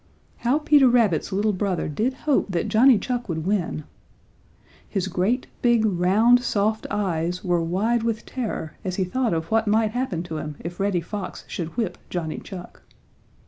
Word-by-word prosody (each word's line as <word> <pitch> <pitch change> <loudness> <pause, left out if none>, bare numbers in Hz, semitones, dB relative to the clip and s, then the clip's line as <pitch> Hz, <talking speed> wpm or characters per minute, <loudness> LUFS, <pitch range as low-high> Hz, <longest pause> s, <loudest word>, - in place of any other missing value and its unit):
How 245 +4 +2
Peter 295 -3 +5
Rabbit's 220 -8 +2
little 205 +2 +1
brother 185 -2 -1
did 225 - -1
hope 290 -4 +2
that 175 -3 -1
Johnny 245 +2 +6
Chuck 245 0 -3
would 160 -1 -3
win! 185 -6 -1 1.1
His 195 -2 -1
great, 195 +8 0 0.2
big, 240 -2 +3
round, 210 +6 +4
soft 215 -2 0
eyes 180 -4 -1
were 175 -3 +1
wide 205 +8 +1
with 230 -1 -2
terror 215 -11 -4
as 185 -2 -3
he 190 - +1
thought 235 +5 0
of 165 0 -2
what 225 0 +2
might 215 +1 +3
happen 230 -9 -2
to 160 -3 -5
him 150 -1 -5
if 175 +1 -7
Reddy 195 -3 +1
Fox 200 +2 -6
should 170 +4 -5
whip 215 -7 -2
Johnny 165 -3 -3
Chuck. 180 -3 -10
200 Hz, 170 wpm, -24 LUFS, 175-230 Hz, 1.1 s, Johnny